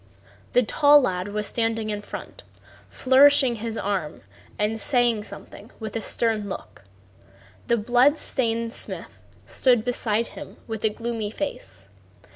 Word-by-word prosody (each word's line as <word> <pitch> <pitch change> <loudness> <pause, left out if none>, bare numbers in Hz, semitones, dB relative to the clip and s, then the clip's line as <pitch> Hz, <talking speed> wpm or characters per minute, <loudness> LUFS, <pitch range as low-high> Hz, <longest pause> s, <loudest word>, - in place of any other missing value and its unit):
The 250 - +5
tall 290 +5 +5
lad 185 -5 -1
was 210 +1 -3
standing 225 -1 -1
in 205 0 -4
front, 355 - -9 0.5
flourishing 265 -1 +5
his 225 0 -4
arm 190 -8 -3 0.4
and 215 +1 -1
saying 240 -5 +2
something 210 - -11
with 220 -1 -6
a 225 - -1
stern 215 -1 -1
look. 145 - -9 0.8
The 235 - +3
blood 245 +7 +3
stained 230 -5 -1
smith - - -7 0.2
stood 245 -4 +2
beside 230 -2 0
him - - -10
with 220 -2 -6
a 220 - +4
gloomy 230 -1 -4
face. 95 - -6
225 Hz, 135 wpm, -24 LUFS, 210-245 Hz, 0.8 s, The